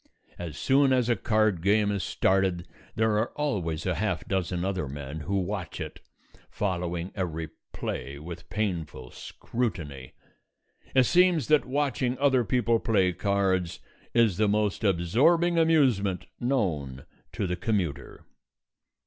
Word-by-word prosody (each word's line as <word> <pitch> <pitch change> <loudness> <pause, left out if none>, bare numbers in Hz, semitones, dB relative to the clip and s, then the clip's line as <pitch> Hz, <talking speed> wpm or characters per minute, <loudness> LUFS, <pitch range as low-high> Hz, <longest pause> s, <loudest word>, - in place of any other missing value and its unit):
As 85 -4 -6
soon 135 0 +3
as 125 -2 +2
a 120 - +4
card 110 -4 +1
game 105 +2 +3
is 100 -2 -1
started 95 -2 +1 0.3
there 110 -1 +2
are 115 - 0
always 90 - -2
a 90 - +1
half 90 -1 -2
dozen 90 -2 -1
other 95 -6 -2
men 70 +2 -6
who 100 +5 -2
watch 95 -2 -3
it, - - -6 0.5
following 90 -2 -2
every 80 -5 -3 0.2
play 70 +3 -5
with 80 +4 -9
painful 85 - -3
scrutiny. 80 - -5 0.8
It 130 - +7
seems 175 -1 +3
that 150 -1 +4
watching 130 -2 -1
other 135 -2 +3
people 115 +1 +1
play 95 -6 +2
cards 95 -2 0 0.3
is 115 -6 +3
the 110 - +3
most 105 0 0
absorbing 135 - +3
amusement 125 - +2
known 80 - -1 0.3
to - - -2
the 90 -1 -1
commuter. 95 - -3
100 Hz, 130 wpm, -27 LUFS, 85-120 Hz, 0.8 s, It